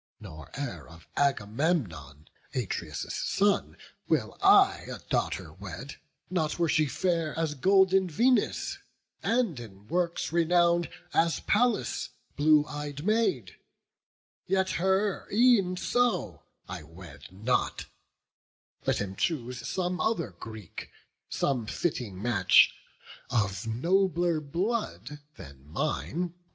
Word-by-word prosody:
Nor 80 Hz, -9 st, -10 dB
e'er 90 Hz, -, -5 dB
of 80 Hz, 0 st, -15 dB
Agamemnon, 105 Hz, -, -1 dB, 0.3 s
Atreus' -, -, -3 dB
son, 200 Hz, 0 st, +1 dB, 0.3 s
Will -, -, 0 dB
I 390 Hz, 0 st, +5 dB
a -, -, -5 dB
daughter -, -, -1 dB
wed; -, -, -8 dB, 0.3 s
not 160 Hz, -5 st, -1 dB
were 170 Hz, -1 st, +2 dB
she 155 Hz, -1 st, +2 dB
fair 165 Hz, -1 st, -1 dB
As 160 Hz, -2 st, 0 dB
golden 190 Hz, +4 st, +4 dB
Venus, 245 Hz, -, +1 dB, 0.4 s
and 230 Hz, -, +1 dB
in 100 Hz, -4 st, -11 dB
works 170 Hz, 0 st, -1 dB
renown'd 170 Hz, 0 st, +3 dB, 0.2 s
As 165 Hz, 0 st, +2 dB
Pallas, 215 Hz, -, +1 dB, 0.3 s
blue 150 Hz, 0 st, +5 dB
ey'd 145 Hz, +1 st, -6 dB
Maid, 210 Hz, -, +1 dB, 0.9 s
yet 190 Hz, 0 st, +1 dB
her 190 Hz, +2 st, 0 dB
e'en 210 Hz, -5 st, +4 dB
so 245 Hz, +4 st, 0 dB, 0.3 s
I 90 Hz, -1 st, -6 dB
wed 80 Hz, -2 st, -12 dB
not; 110 Hz, +7 st, -1 dB, 1.0 s
let -, -, +2 dB
him 95 Hz, -1 st, -4 dB
choose 125 Hz, -, -2 dB
some 180 Hz, -1 st, -2 dB
other 165 Hz, -, 0 dB
Greek, 105 Hz, +1 st, -9 dB, 0.4 s
Some 125 Hz, -6 st, -1 dB
fitting 115 Hz, -, -2 dB
match, 105 Hz, -4 st, +5 dB, 0.6 s
of 105 Hz, -1 st, -1 dB
nobler 175 Hz, -, +1 dB
blood 170 Hz, -1 st, -3 dB, 0.2 s
than 70 Hz, -, -12 dB
mine. 155 Hz, -, -2 dB
155 Hz, 110 wpm, -28 LUFS, -, 1.0 s, I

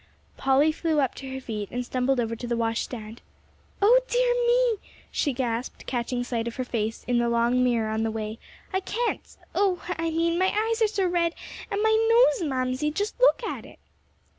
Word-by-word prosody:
Polly 270 Hz, +3 st, +3 dB
flew 315 Hz, -1 st, 0 dB
up 270 Hz, -4 st, +1 dB
to 270 Hz, -1 st, -8 dB
her 265 Hz, -, -4 dB
feet 215 Hz, -5 st, -5 dB
and 245 Hz, 0 st, -3 dB
stumbled 255 Hz, +1 st, 0 dB
over 230 Hz, -1 st, -1 dB
to 240 Hz, +2 st, -6 dB
the 235 Hz, 0 st, -1 dB
washstand. 225 Hz, -1 st, -3 dB, 0.6 s
"O 475 Hz, +5 st, +7 dB
dear -, -, +2 dB
me!" 480 Hz, -3 st, +3 dB, 0.3 s
she 290 Hz, -, 0 dB
gasped, 240 Hz, -2 st, -3 dB
catching 245 Hz, 0 st, -2 dB
sight 235 Hz, -2 st, -2 dB
of 235 Hz, -, -5 dB
her 255 Hz, -, -2 dB
face 225 Hz, -2 st, -3 dB
in 245 Hz, -1 st, +2 dB
the 235 Hz, 0 st, +1 dB
long 235 Hz, +2 st, +2 dB
mirror 230 Hz, -3 st, +1 dB
on 220 Hz, 0 st, -1 dB
the 225 Hz, -, 0 dB
way, 220 Hz, 0 st, -4 dB, 0.3 s
"I 380 Hz, -, +2 dB
can't 460 Hz, +5 st, -3 dB, 0.2 s
oh, 385 Hz, -3 st, +1 dB, 0.2 s
I 330 Hz, 0 st, 0 dB
mean 335 Hz, +1 st, +1 dB
my 375 Hz, 0 st, +3 dB
eyes 445 Hz, +3 st, 0 dB
are 440 Hz, -, +5 dB
so 410 Hz, -3 st, 0 dB
red, 345 Hz, -1 st, +1 dB, 0.3 s
and 410 Hz, +1 st, -1 dB
my 440 Hz, 0 st, +4 dB, 0.4 s
nose, 330 Hz, -5 st, -1 dB
Mamsie! 255 Hz, +2 st, 0 dB
Just 410 Hz, +10 st, -3 dB
look -, -, +4 dB
at -, -, -4 dB
it!" -, -, -14 dB
265 Hz, 195 wpm, -26 LUFS, 235-375 Hz, 0.6 s, O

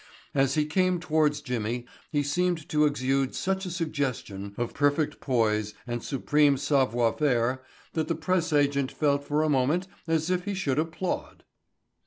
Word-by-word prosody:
As 135 Hz, 0 st, +2 dB
he 150 Hz, -1 st, +2 dB
came 185 Hz, +3 st, +1 dB
towards 155 Hz, -3 st, +1 dB
Jimmy 120 Hz, -2 st, -3 dB, 0.3 s
he 145 Hz, -2 st, +1 dB
seemed 170 Hz, +2 st, 0 dB
to 150 Hz, -4 st, +3 dB
exude 135 Hz, -1 st, 0 dB
such 190 Hz, 0 st, -1 dB
a -, -, -3 dB
suggestion 135 Hz, -, -3 dB
of 120 Hz, -1 st, -2 dB
perfect 145 Hz, +1 st, +1 dB
poise 110 Hz, -5 st, 0 dB
and 120 Hz, -1 st, -4 dB
supreme 145 Hz, +1 st, +2 dB
savoir 125 Hz, -5 st, +2 dB
faire 130 Hz, -3 st, +1 dB, 0.3 s
that 160 Hz, -1 st, -1 dB
the 165 Hz, -, 0 dB
press 185 Hz, -3 st, 0 dB
agent 140 Hz, -2 st, +2 dB
felt 140 Hz, -2 st, +1 dB
for 150 Hz, +2 st, +1 dB
a -, -, +2 dB
moment 145 Hz, +6 st, +2 dB, 0.2 s
as 160 Hz, +1 st, +1 dB
if 180 Hz, 0 st, 0 dB
he 205 Hz, -1 st, -2 dB
should 150 Hz, -7 st, 0 dB
applaud. 165 Hz, +3 st, -3 dB
145 Hz, 160 wpm, -27 LUFS, 130-160 Hz, 0.3 s, to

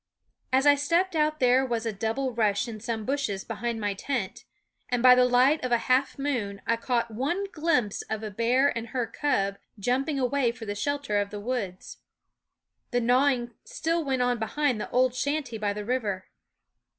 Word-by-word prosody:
As 265 Hz, +2 st, +3 dB
I 290 Hz, -, +8 dB
stepped 335 Hz, +6 st, +1 dB
out 305 Hz, 0 st, +1 dB
there 255 Hz, +1 st, +4 dB
was 235 Hz, -3 st, -2 dB
a 225 Hz, -, -1 dB
double 225 Hz, +6 st, -2 dB
rush 210 Hz, -1 st, +1 dB
in 220 Hz, -2 st, -7 dB
some 225 Hz, -1 st, -4 dB
bushes 260 Hz, -8 st, -1 dB
behind 235 Hz, 0 st, -3 dB
my 205 Hz, -2 st, -1 dB
tent, 210 Hz, -1 st, -4 dB, 0.4 s
and 245 Hz, -1 st, 0 dB
by 255 Hz, -1 st, +9 dB
the 250 Hz, 0 st, +5 dB
light 255 Hz, +5 st, +4 dB
of 255 Hz, -, -2 dB
a 240 Hz, -, +5 dB
half 255 Hz, +3 st, +1 dB
moon 240 Hz, -8 st, -2 dB
I 230 Hz, -, +2 dB
caught 235 Hz, 0 st, -1 dB
one 290 Hz, -, -1 dB
glimpse 300 Hz, -10 st, 0 dB
of 220 Hz, 0 st, -3 dB
a 215 Hz, -, -4 dB
bear 245 Hz, +7 st, +2 dB
and 230 Hz, 0 st, -4 dB
her 245 Hz, 0 st, -2 dB
cub 200 Hz, -5 st, -1 dB, 0.2 s
jumping 270 Hz, +7 st, 0 dB
away 255 Hz, -2 st, +1 dB
for 240 Hz, -2 st, -9 dB
the 205 Hz, -, -3 dB
shelter 280 Hz, 0 st, -1 dB
of 200 Hz, -, -4 dB
the 205 Hz, -, -6 dB
woods. 205 Hz, -5 st, -4 dB, 0.9 s
The 245 Hz, -, +1 dB
gnawing 245 Hz, 0 st, +2 dB
still 330 Hz, +1 st, -1 dB
went 265 Hz, -3 st, 0 dB
on 245 Hz, -1 st, +1 dB
behind 250 Hz, 0 st, 0 dB
the -, -, -5 dB
old 255 Hz, 0 st, +2 dB
shanty 255 Hz, -2 st, -2 dB
by 205 Hz, -1 st, 0 dB
the 205 Hz, 0 st, -5 dB
river. 210 Hz, -6 st, -2 dB
245 Hz, 185 wpm, -27 LUFS, 220-275 Hz, 0.9 s, by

